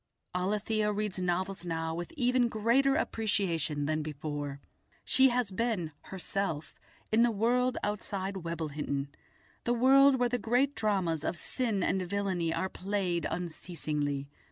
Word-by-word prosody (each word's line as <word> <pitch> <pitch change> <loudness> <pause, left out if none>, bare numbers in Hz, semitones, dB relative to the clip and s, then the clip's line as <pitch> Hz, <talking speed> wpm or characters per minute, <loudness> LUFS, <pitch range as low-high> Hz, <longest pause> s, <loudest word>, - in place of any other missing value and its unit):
Alethia 210 +3 0
reads 210 -2 -2
novels 185 +1 -1
now 165 -1 -2
with 175 +1 -5
even 250 -2 +3
greater 240 +6 +3
appreciation 175 - 0
than 155 +1 0
before. 145 -1 -4 0.5
She 265 0 +6
has 245 -4 0
been 195 -6 -1
herself 185 -4 -3 0.3
in 220 +1 +5
the 240 - +5
world 245 +4 +2
outside 200 -2 -2
Webblehinton, 150 -5 -3 0.5
the 240 - +1
world 270 +3 +6
where 245 -1 +2
the 245 0 -1
great 250 +5 +2
dramas 185 - 0
of 175 - -1
sin 220 -1 -1
and 190 +2 +1
villainy 185 -3 -1
are 165 +3 0
played 185 -3 -1
unceasingly. 155 -4 -3
190 Hz, 130 wpm, -31 LUFS, 165-230 Hz, 0.5 s, She